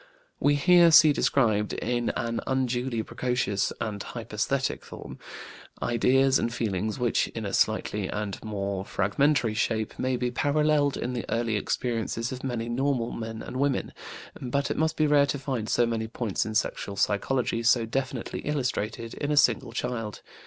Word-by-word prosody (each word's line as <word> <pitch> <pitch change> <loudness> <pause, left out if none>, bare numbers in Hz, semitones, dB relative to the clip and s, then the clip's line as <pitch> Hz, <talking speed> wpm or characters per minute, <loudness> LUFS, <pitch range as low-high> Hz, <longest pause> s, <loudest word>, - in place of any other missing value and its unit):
We 145 +1 +3
here 175 +3 +6
see 155 -1 +8
described, 110 -8 +2
in 120 -1 -1
an 115 -1 -2
unduly 125 -3 0
precocious 125 -5 -1
and 105 -2 -3
hyperesthetic 115 +3 -2
form, - - -10 0.6
ideas 130 +3 +3
and 115 - -1
feelings 110 -3 -2
which, 120 -3 +1
in 115 -2 -6
a 100 - -4
slighter 105 -2 +1
and 105 -2 -4
more 100 -3 -3
fragmentary 115 +5 +1
shape, 110 0 -1
may 130 0 0
be 125 0 -1
paralleled 145 +2 +2
in 125 - -3
the 120 - -3
early 115 -1 0
experiences 115 +1 -2
of 130 0 -6
many 120 -3 -2
normal 125 -1 0
men 110 -1 -6
and 125 - -6
women. 140 0 0 0.5
But 140 +2 -1
it - - -2
must 160 0 0
be 155 - +3
rare 145 -1 +4
to 140 - -1
find 130 -6 -3
so 120 - +3
many 115 -1 -2
points 110 -2 -2
in 110 - -5
sexual 105 -2 -1
psychology 115 +4 0
so 115 0 +3
definitely 130 +1 -3
illustrated 120 -5 -2
in 145 - -3
a 150 - +1
single 135 -4 +3
child. 115 -3 -4
120 Hz, 160 wpm, -27 LUFS, 110-135 Hz, 0.6 s, see